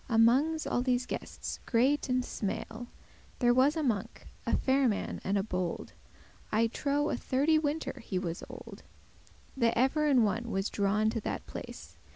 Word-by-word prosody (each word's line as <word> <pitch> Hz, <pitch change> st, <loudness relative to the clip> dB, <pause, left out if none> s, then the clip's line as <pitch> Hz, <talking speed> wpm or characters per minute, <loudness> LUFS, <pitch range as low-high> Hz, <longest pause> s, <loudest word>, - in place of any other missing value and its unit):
Amonges 255 Hz, +8 st, +4 dB
all 245 Hz, -, 0 dB
these 250 Hz, -1 st, +1 dB
guestes -, -, -5 dB
great 265 Hz, +4 st, +2 dB
and 250 Hz, 0 st, +1 dB
smale, 225 Hz, +3 st, -4 dB, 0.5 s
There 240 Hz, -2 st, +4 dB
was 265 Hz, +5 st, +4 dB
a 315 Hz, -, 0 dB
monk, 220 Hz, -8 st, -2 dB, 0.2 s
a -, -, +3 dB
fair 270 Hz, 0 st, +3 dB
man 210 Hz, -3 st, -2 dB
and 200 Hz, +2 st, +1 dB
a 195 Hz, -, +1 dB
bold, 180 Hz, -4 st, -3 dB, 0.6 s
I 220 Hz, +2 st, +3 dB
trow 285 Hz, +5 st, 0 dB
a -, -, 0 dB
thirty 295 Hz, +4 st, +2 dB
winter 295 Hz, -2 st, -2 dB
he 190 Hz, -, -3 dB
was 175 Hz, -2 st, -3 dB
old, -, -, -10 dB, 0.7 s
That 235 Hz, -3 st, +2 dB
ever 285 Hz, +5 st, +3 dB
in 260 Hz, -5 st, +5 dB
one* 225 Hz, +3 st, -1 dB
was 195 Hz, -1 st, -1 dB
drawing 210 Hz, +2 st, +2 dB
to 225 Hz, -, -3 dB
that -, -, -4 dB
place. -, -, -9 dB
245 Hz, 170 wpm, -31 LUFS, 215-275 Hz, 0.7 s, in